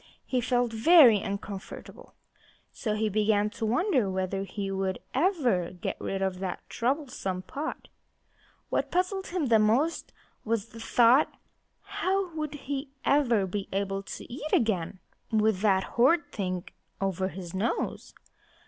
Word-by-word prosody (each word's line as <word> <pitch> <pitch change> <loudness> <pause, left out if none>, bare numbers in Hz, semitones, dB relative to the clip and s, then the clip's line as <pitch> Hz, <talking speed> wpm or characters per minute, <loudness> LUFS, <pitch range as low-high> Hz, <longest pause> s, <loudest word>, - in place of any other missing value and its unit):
He 255 -2 0
felt 245 -1 +1
very 240 - +7
uncomfortable, 200 -1 -7 0.6
for 215 -2 -2
he 215 +1 0
began 210 0 +2
to 225 - -3
wonder 255 - +2
whether 190 +1 -2
he 195 +1 -4
would 190 -1 -1 0.2
ever 260 - +1
get 180 -1 -4
rid 195 0 -2
of 190 -1 -1
that 185 -2 -5
troublesome 250 -8 -2
pot. 300 +9 -5 0.8
What - - 0
puzzled 370 +2 0
him 345 -5 -1
most 255 +10 +1 0.3
was 225 -1 -1
this 230 0 -9
thought: 245 +5 +5 0.5
How 390 -2 -1
would 305 -2 -4
he 275 0 -3 0.2
ever 240 -8 +3
be 195 +1 -4
able 195 0 -1
to 200 - -9
eat 300 +4 -5
again, 195 -6 +1 0.3
with 215 -3 +2
that 195 -3 +3
horrid 270 - +2
thing 185 -3 -3 0.4
over 190 -1 -1
his 185 -2 -8
nose? 200 +5 -2
220 Hz, 135 wpm, -28 LUFS, 195-280 Hz, 0.8 s, very